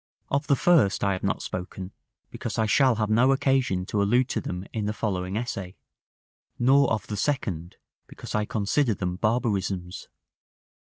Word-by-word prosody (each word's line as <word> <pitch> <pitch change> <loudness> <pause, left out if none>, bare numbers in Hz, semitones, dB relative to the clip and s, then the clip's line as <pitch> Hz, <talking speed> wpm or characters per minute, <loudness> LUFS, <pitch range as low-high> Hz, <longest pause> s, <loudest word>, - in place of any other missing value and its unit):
Of 140 +1 0
the 140 - +4
first 140 - +3
I 100 -1 +2
have 95 - -4
not 100 - -1
spoken, 90 +1 -6 0.4
because - - -5
I 110 - +2
shall 130 +3 +4
have 110 0 -1
no 125 +5 +4
occasion 135 -9 +1
to 100 +2 -1
allude 120 +6 +2
to - - -1
them 90 +1 -5
in 110 -2 -2
the 105 - -1
following 95 -2 -2
essay; 100 -6 -4 0.8
nor 135 +3 +4
of 110 - -1
the 105 - -5
second, 95 - -2 0.3
because - - -9
I 105 0 +1
consider 110 +3 +1
them 90 -1 -3
barbarisms. 100 -5 -1
105 Hz, 165 wpm, -26 LUFS, 95-125 Hz, 0.8 s, the